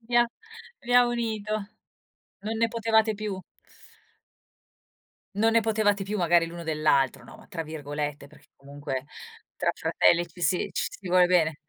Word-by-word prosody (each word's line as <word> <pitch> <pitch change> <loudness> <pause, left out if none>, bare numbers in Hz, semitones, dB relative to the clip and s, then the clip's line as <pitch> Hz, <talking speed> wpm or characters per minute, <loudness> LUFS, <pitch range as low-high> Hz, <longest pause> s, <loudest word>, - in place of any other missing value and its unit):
vi 240 +1 -2
ha 240 0 +6 0.5
vi 245 - -4
ha 245 0 +7
unito. 220 -3 -2 0.9
Non 215 +3 -3
ne 230 +1 +2
potevate 220 -1 +2
più. 205 -2 -4 1.9
"Non 225 +3 +2
ne 230 - +5
potevate 210 -2 +1
più 205 +2 -3
magari 170 -2 +3
l'uno 170 0 -8
dell'altro", 150 -4 +1
no, - - -13
ma - - -17
tra 165 - -5
virgolette, 145 -2 -5
perché - - -20
comunque 140 -1 -6 0.5
tra - - +1
fratelli, 175 0 +2
ci 170 +1 -16
si 180 - +1
ci - - -1
si 190 - -9
vuole 180 0 +5
bene. 165 -4 +2
185 Hz, 155 wpm, -27 LUFS, 160-220 Hz, 1.9 s, ha